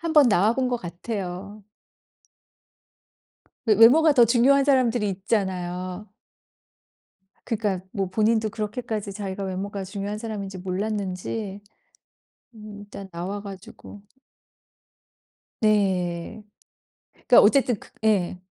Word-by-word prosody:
한번 310 -5 +4
나와 210 +3 +3
본 260 -1 0
것 245 - 0
같아요. 195 +2 -6 2.0
왜 215 -3 +4
외모가 290 +9 +7
더 245 -4 +6
중요한 260 +4 +4
사람들이 245 -6 +2
있잖아요. 185 -1 -3 1.4
그러니까 205 -5 -2
뭐 195 -1 -1
본인도 220 +1 +2
그렇게까지 215 -1 -4
자기가 195 -1 -5
외모가 195 +1 -4
중요한 200 +2 -5
사람인지 200 -4 -6
몰랐는지 195 +1 -4 0.9
음 210 -1 -10
일단 200 -1 -10
나와 185 +4 -5
가지고 200 +1 -11 1.6
네. 195 -2 0 0.7
그러니까 245 - +5
어쨌든 245 -1 +3
그 - - -16 0.2
예. 185 -4 +1
205 Hz, 235 characters per minute, -24 LUFS, 190-225 Hz, 2.0 s, 외모가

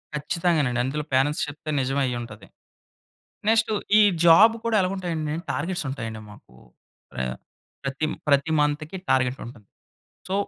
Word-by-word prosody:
ఖచ్చితంగానండి. 150 -4 0
అందులో 150 +3 -3
పేరెంట్స్ 135 +3 +2
చెప్తే 145 +1 -8
నిజం 135 +1 -1
అయి 125 -1 -2
ఉంటది. 110 -4 -10 1.0
నెక్స్ట్ 225 0 +3 0.3
ఈ - - +7 0.2
జాబ్ 200 +7 +7
కూడా 230 -1 +1
ఎలాగు 185 +1 0
ఉంటాయండి! 160 -5 -3 0.2
టార్గెట్స్ 170 +3 -3
ఉంటాయండి 110 -5 -5
మాకు. 85 -11 -17 0.7
ఆహ్, 65 -1 -2 0.5
ప్రతి, 135 +3 -2 0.2
ప్రతి 140 +2 +3
మంత్‌కి 150 +4 -1
టార్గెట్ 130 0 +2
ఉంటుంది. 115 -5 -13 0.6
సో, 190 - -2
145 Hz, 130 wpm, -24 LUFS, 125-170 Hz, 1.0 s, ఈ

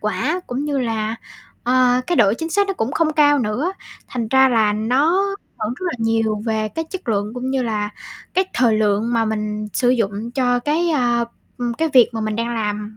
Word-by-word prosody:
quả 220 - -1
cũng 265 +4 -3
như 285 -2 -1
là, 225 -2 -1 0.5
ờ, 250 0 +3
cái 350 - 0
độ 200 0 +5
chính 325 0 -4
xác 405 +3 +2
nó 390 - -1
cũng 235 +1 -2
không 320 -1 +1
cao 290 -1 +4
nữa. 250 - -1 0.4
Thành 235 -3 -3
ra 265 +1 +5
là 220 -4 +3
nó 275 - +2 0.3
hưởng 215 +3 -2
rất 370 - -8
là 345 - -1
nhiều 225 -2 0
về 220 -1 0
cái 325 +9 -4
chất 375 -8 -7
lượng 210 +1 -1
cũng 255 +1 -3
như 265 -1 0
là 210 -3 -2 0.4
cái 375 - +3
thời 235 -4 +3
lượng 215 +2 +1
mà 230 -1 +2
mình 210 -1 -3
sử 245 - +1
dụng 225 -2 -1
cho 245 -1 +1
cái, 320 +6 0
a, 240 -5 +2 0.3
ưm, 240 -1 -2
cái 320 +4 0
việc 250 -3 +7
mà 225 - -3
mình 215 -1 -2
đang 235 +1 -2
làm, 210 -1 -3
240 Hz, 215 wpm, -20 LUFS, 215-275 Hz, 0.5 s, việc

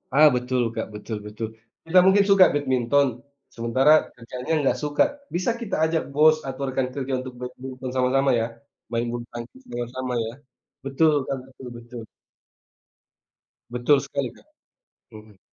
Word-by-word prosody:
Ah, 155 +2 +8
betul, 125 0 0
Kak, - - -3
betul 105 +1 -5
betul. 110 +2 -5 0.4
Kita 180 +3 +5
mungkin 200 +1 +6
suka 195 -2 +8
badminton, 135 0 +2 0.5
sementara 120 +5 +3 0.2
kerjaannya 125 +5 -5
nggak - - +2
suka. 145 0 +3 0.3
Bisa 185 +6 +1
kita 205 -5 -2
ajak 160 0 +1
bos 155 +2 +6
atau 135 +1 -6
rekan 130 0 -1
kerja 135 -1 -3
untuk 130 0 -7
badminton 125 +1 -7
sama-sama 135 +2 +2
ya. 115 - 0 0.5
Main 115 +1 0
bulutangkis 120 - -8
sama-sama 125 +1 -4
ya. 110 - -5 0.5
Betul, 150 +3 +3
Kak, 135 - -1
betul 130 -1 -12
betu 120 +1 -12 1.7
Betul 125 +4 +3
sekali, 140 -2 -3
Kak. - - -21 0.7
Mhm. 105 -2 -14
130 Hz, 140 wpm, -24 LUFS, 120-145 Hz, 1.7 s, Ah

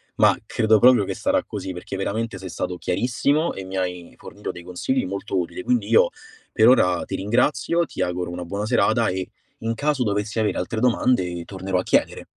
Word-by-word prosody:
Ma - - +4
credo 110 0 +3
proprio 125 -3 +6
che - - -4
sarà - - +1
così, 95 - -5
perché 90 +2 -7
veramente 105 +2 -2
sei 95 0 -8
stato 90 +1 -4
chiarissimo 130 - 0
e 95 - -6
mi 95 +1 -6
hai 90 -2 -4
fornito - - -7
dei 90 - -11
consigli 90 +9 -1
molto 95 +1 -3
utili. 85 - -4
Quindi 250 -1 +1
io 485 +2 +5 0.4
per 110 - +4
ora 90 -8 +4
ti - - -4
ringrazio, 130 - +1
ti - - -6
auguro 90 0 -1
una 90 0 -5
buona 100 +4 -4
serata 115 0 +2
e 95 0 -3 0.3
in 115 0 -2
caso 145 +1 0
dovessi 105 0 -2
avere 110 -1 0
altre 110 - -2
domande, 115 -8 +1
tornerò 95 -1 -2
a - - -2
chiedere. - - +1
100 Hz, 195 wpm, -23 LUFS, 90-125 Hz, 0.4 s, proprio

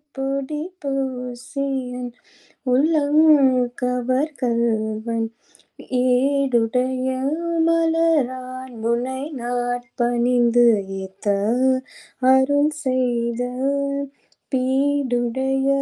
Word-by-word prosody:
பொடி 275 +2 -3 0.2
பூசியன் 260 -1 -4 0.6
உள்ளம் 300 +2 +3 0.6
கவர் 250 +4 0
கள்வன், 230 -1 0 0.8
ஏடுடைய 255 -1 +1 0.6
மலரான் 275 -7 0
முனை 245 +3 -1 0.2
நாட் 245 0 -2
பணிந்து 240 0 +3 0.4
ஏத்த 190 +2 -12 1.1
அருள் 285 +3 +3
செய்தல் 255 +3 -1 0.5
பீடுடைய 265 0 0
255 Hz, 55 wpm, -21 LUFS, 245-275 Hz, 1.1 s, உள்ளம்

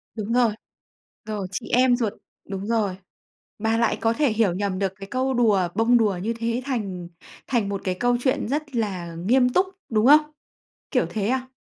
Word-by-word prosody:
Đúng 215 0 -3
rồi. 240 -2 +4 0.7
Rồi, 210 -3 -4
chị 185 - -5
em 250 0 +4
ruột, 225 -4 -1 0.4
đúng 195 0 -5
rồi, 215 -5 0 0.6
bà 220 +1 +1
lại 230 -1 +1
có 225 0 +2
thể 285 0 +2
hiểu 215 -4 +2
nhầm 190 0 -2
được 195 -1 -1
cái 195 +1 -9
câu 260 +4 -1
đùa, 215 -7 +3
bông 230 +3 +4
đùa 210 -5 +1
như 225 +4 -1
thế 230 +1 -2
thành 200 -10 -3 0.4
thành 230 -6 0
một 200 -1 -3
cái 185 -1 -1
câu 245 0 +2
chuyện 260 +1 0
rất 290 +1 -3
là 185 -7 -2
nghiêm 245 +9 +3
túc, 365 +9 +3 0.2
đúng 215 -1 +2
không? 300 +1 +6 0.6
Kiểu - - +2
thế 210 -2 -1
à? 260 +1 -1
225 Hz, 190 wpm, -24 LUFS, 200-250 Hz, 0.7 s, không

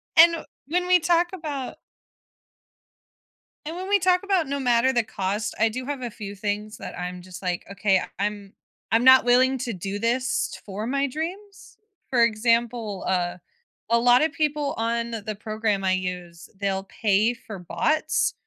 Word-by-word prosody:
And 335 0 +6 0.2
when 360 +4 0
we 365 -1 +6
talk 340 +1 +3
about 295 -7 -5 1.9
and 320 +2 -5
when 375 +2 -5
we 405 0 +4
talk 365 +1 +3
about 380 -6 +1
no 280 +1 -2
matter 250 0 +3
the 240 -2 +2
cost, 205 0 -3
I 225 +1 +4
do 255 +3 -5
have 285 -2 -4
a 245 - -3
few 205 -2 -8
things 210 +1 -3
that - - -8
I'm 180 0 -5
just 180 0 -11
like, 180 -2 -2
"Okay, 195 -1 +2 0.2
I'm 205 -1 -3 0.4
I'm 225 +2 +3
not 260 0 +8
willing 255 +2 +4
to 240 -2 -3
do 195 +3 -4
this 245 +3 -1
for 210 +3 -5
my 275 +2 +1
dreams." 365 +8 -7 0.3
For 240 -3 +4
example, 230 -2 +1
uh, 175 -1 0 0.5
a 235 0 +4
lot 245 +1 +5
of 320 - +1
people 295 -1 -1
on 230 +1 -1
the 215 -1 -4
program 215 -2 -1
I 190 - +2
use, 180 -2 -5
they'll 195 -1 -1
pay 215 +3 +1
for 215 -4 -10
bots, 310 - 0
235 Hz, 165 wpm, -24 LUFS, 205-280 Hz, 1.9 s, not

